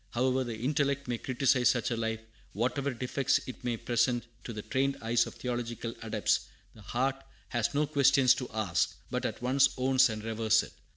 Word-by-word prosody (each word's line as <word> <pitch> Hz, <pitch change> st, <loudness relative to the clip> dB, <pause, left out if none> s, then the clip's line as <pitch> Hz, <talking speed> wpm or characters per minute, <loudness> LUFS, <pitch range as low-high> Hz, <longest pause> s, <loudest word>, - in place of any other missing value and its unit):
However 130 Hz, +2 st, +1 dB
the 120 Hz, -3 st, -5 dB
intellect 140 Hz, +3 st, 0 dB
may 120 Hz, -2 st, -2 dB
criticise 130 Hz, -1 st, +2 dB
such 125 Hz, 0 st, 0 dB
a -, -, +1 dB
life, 110 Hz, -1 st, -2 dB, 0.3 s
whatever 130 Hz, +6 st, -1 dB
defects 130 Hz, +2 st, 0 dB
it 130 Hz, -, -9 dB
may 120 Hz, -2 st, -1 dB
present 120 Hz, +1 st, 0 dB, 0.2 s
to -, -, -5 dB
the 105 Hz, -2 st, -6 dB
trained 135 Hz, +1 st, 0 dB
eyes 115 Hz, +1 st, +1 dB
of -, -, -9 dB
theological 120 Hz, -2 st, -4 dB
adepts, 110 Hz, -2 st, 0 dB, 0.3 s
the 110 Hz, -, -15 dB
heart 130 Hz, +6 st, -1 dB, 0.3 s
has 120 Hz, +2 st, -1 dB
no 150 Hz, +1 st, +3 dB
questions 140 Hz, -3 st, +5 dB
to 125 Hz, -, -5 dB
ask, 100 Hz, -9 st, 0 dB, 0.2 s
but -, -, -1 dB
at -, -, -7 dB
once 130 Hz, +2 st, +4 dB
owns 130 Hz, 0 st, +4 dB
and 110 Hz, -1 st, -5 dB
reveres 110 Hz, 0 st, +2 dB
it. -, -, -11 dB
125 Hz, 185 wpm, -30 LUFS, 115-130 Hz, 0.3 s, questions